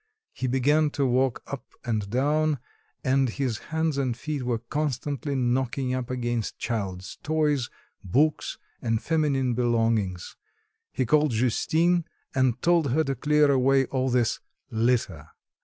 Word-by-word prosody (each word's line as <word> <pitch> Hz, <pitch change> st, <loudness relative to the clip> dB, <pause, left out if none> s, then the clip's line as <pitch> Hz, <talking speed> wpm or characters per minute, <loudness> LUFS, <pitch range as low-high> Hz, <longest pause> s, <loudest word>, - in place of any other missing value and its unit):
He 130 Hz, -, -3 dB
began 145 Hz, +4 st, +3 dB
to 140 Hz, -, +2 dB
walk 130 Hz, 0 st, +1 dB
up 140 Hz, -, -6 dB, 0.2 s
and 110 Hz, -4 st, -1 dB
down, 150 Hz, +5 st, +1 dB, 0.5 s
and 130 Hz, 0 st, +2 dB
his 125 Hz, -2 st, -2 dB
hands 160 Hz, -2 st, 0 dB
and 125 Hz, -4 st, -1 dB
feet 150 Hz, +3 st, -3 dB
were 120 Hz, -2 st, 0 dB
constantly 140 Hz, +2 st, -2 dB
knocking 130 Hz, +1 st, 0 dB
up 130 Hz, -1 st, -3 dB
against 120 Hz, -3 st, -2 dB
child's 95 Hz, -5 st, -4 dB
toys, 150 Hz, -5 st, +1 dB, 0.3 s
books 145 Hz, -, +1 dB, 0.2 s
and 115 Hz, -1 st, 0 dB
feminine 140 Hz, -5 st, +1 dB
belongings; 115 Hz, -6 st, 0 dB, 0.5 s
he 130 Hz, -, -1 dB
called 150 Hz, +5 st, +3 dB
Justine 160 Hz, +9 st, +2 dB, 0.3 s
and 130 Hz, -3 st, +2 dB
told 170 Hz, -4 st, +3 dB
her 160 Hz, +2 st, +3 dB
to 135 Hz, -2 st, -1 dB
clear 150 Hz, +2 st, +3 dB
away 135 Hz, 0 st, +3 dB
all 130 Hz, 0 st, -1 dB
this 120 Hz, -2 st, +1 dB, 0.3 s
"litter." 110 Hz, -, 0 dB
130 Hz, 135 wpm, -26 LUFS, 120-150 Hz, 0.5 s, began